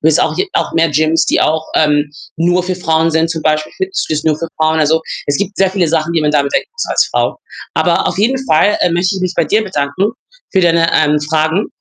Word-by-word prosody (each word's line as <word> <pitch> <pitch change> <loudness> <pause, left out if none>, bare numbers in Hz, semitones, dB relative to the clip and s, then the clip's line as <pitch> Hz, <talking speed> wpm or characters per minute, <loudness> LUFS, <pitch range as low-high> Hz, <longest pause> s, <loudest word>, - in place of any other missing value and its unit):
es 160 +1 +3
auch - - +1
j 385 +1 0
auch - - -1
mehr 165 0 +2
Gyms, 155 +2 +1
die - - +1
auch, 155 +1 +1
ähm, 150 -1 +2 0.3
nur 175 +2 +1
für 185 - -2
Frauen 165 -2 +1
sind, 160 +1 +1
zum 160 -1 -4
Beispiel 155 0 0
Fitnessstudios 380 - -2
nur 155 -2 +2
für 165 - -4
Frauen. 160 0 +1
Also, 160 +2 +2 0.2
es 145 - +1
gibt 200 0 -3
sehr 195 -1 +3
viele 190 -2 0
Sachen, 160 +1 0
die 165 - +2
man 150 - +2
da 145 - +3
bedenken 140 - -1
muss 470 - -4
als - - +1
Frau. - - 0 0.4
Aber - - +1
auf - - -4
jeden 260 +6 +1
Fall, 200 +4 +3
äh, 180 - +2
möchte 175 +3 0
ich 190 - -4
mich 185 -1 -2
bei - - +2
dir 215 +1 +1
bedanken 190 0 -1 0.4
für 190 - +3
deine, 165 -1 +3
ähm, 150 -1 +3
Fragen. 160 +5 0
165 Hz, 240 wpm, -14 LUFS, 155-185 Hz, 0.4 s, es